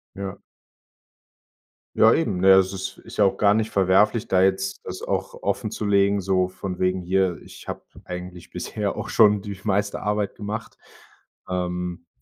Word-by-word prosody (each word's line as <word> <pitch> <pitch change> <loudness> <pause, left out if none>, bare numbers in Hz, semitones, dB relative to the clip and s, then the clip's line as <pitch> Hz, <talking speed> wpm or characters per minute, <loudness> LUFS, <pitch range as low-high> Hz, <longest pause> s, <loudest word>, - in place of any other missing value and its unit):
Ja. 95 0 -5 1.6
Ja, 110 - +6
eben, 110 - +1
ne, 95 +1 +4
das 95 0 +3
ist 95 0 -5
ist - - -12
ja 105 - +5
auch 95 - +1
gar 100 -1 +4
nicht 110 +1 0
verwerflich, 100 +4 +3
da 95 -1 +3
jetzt 95 0 +1
das - - -7
auch - - -2
offenzulegen, 100 -1 +1
so 95 -1 +1
von 95 0 -6
wegen 90 0 +1
„hier, 95 -1 +1
ich - - -13
habe - - -6 0.2
eigentlich 90 -1 -8
bisher 105 -2 -3
auch - - -5
schon 105 -2 +4
die 100 -2 -7
meiste 100 -1 0
Arbeit 105 -1 -1
gemacht, 105 +2 -6 0.7
ähm, 90 -1 -3
95 Hz, 155 wpm, -24 LUFS, 90-105 Hz, 1.6 s, Ja